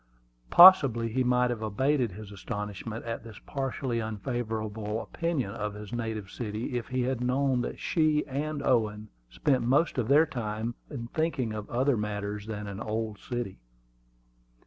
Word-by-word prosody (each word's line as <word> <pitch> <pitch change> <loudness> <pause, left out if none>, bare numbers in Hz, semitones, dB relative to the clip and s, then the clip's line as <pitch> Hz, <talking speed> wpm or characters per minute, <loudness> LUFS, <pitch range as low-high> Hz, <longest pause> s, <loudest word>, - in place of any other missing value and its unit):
Possibly 135 -11 +8
he 130 +3 +1
might 125 0 +3
have 115 -2 -4
abated 120 +2 +1
his 105 +1 -9
astonishment 105 +2 -5
at 115 -1 -4
this 110 -3 -11
partially 135 -3 -2
unfavorable 110 -1 -3
opinion 150 -5 -2
of 105 -1 -4
his 105 0 -9
native 110 -4 -3
city 110 +1 -4
if 120 +1 -2
he 130 -2 -1
had 130 -1 -1
known 130 0 +1
that - - -4
she 155 -2 +1
and 145 +1 -3
Owen 110 -4 +1 0.2
spent 130 - +1
most 135 +4 +2
of 115 - 0
their 145 +4 +6
time 115 -5 -3 0.2
in 125 -5 -5
thinking 150 -8 -1
of 105 -1 -6
other 130 +1 +2
matters 105 0 -3
than 105 -1 -4
an 100 -1 -6
old 110 -1 -3
city. 120 - -4
115 Hz, 155 wpm, -29 LUFS, 105-130 Hz, 0.2 s, Possibly